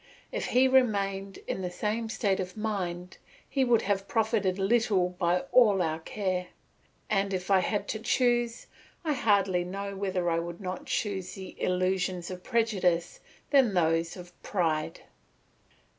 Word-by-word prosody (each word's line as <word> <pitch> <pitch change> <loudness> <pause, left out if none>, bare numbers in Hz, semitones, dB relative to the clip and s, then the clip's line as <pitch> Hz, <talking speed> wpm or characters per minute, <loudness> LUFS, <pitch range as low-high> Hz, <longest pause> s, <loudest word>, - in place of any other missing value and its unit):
If - - -2
he 255 +2 +4
remained 200 -7 +1
in - - -3
this 180 -1 -5 0.4
state 195 -4 +1
of 185 +2 -5
mind, 185 -5 -3 0.3
he 270 - +1
would 240 -3 +3
have 195 -1 -1
profited 215 -4 +1
little 195 -3 +2
by 180 0 0
all 215 -6 +6
our 160 -2 0
care; 185 +1 -2 0.6
and 195 -2 +1
if 185 +2 -4
I 190 - +6
had 205 +2 -1
to 220 - -2
choose, 240 0 +1 0.4
I 305 - +2
hardly 200 -7 +2
know 200 +2 -5
whether 190 -2 -1
I 165 - +1
would 170 0 -6
not 185 -3 -3
rather - - -17
choose 190 -3 -2
the 190 -2 -9
illusions 185 -1 0
of 180 0 -7
prejudice 190 -7 0 0.3
than 260 -8 +4
those 165 0 +1
of 175 -1 -11
pride. 160 -6 -1
195 Hz, 150 wpm, -29 LUFS, 180-215 Hz, 0.6 s, all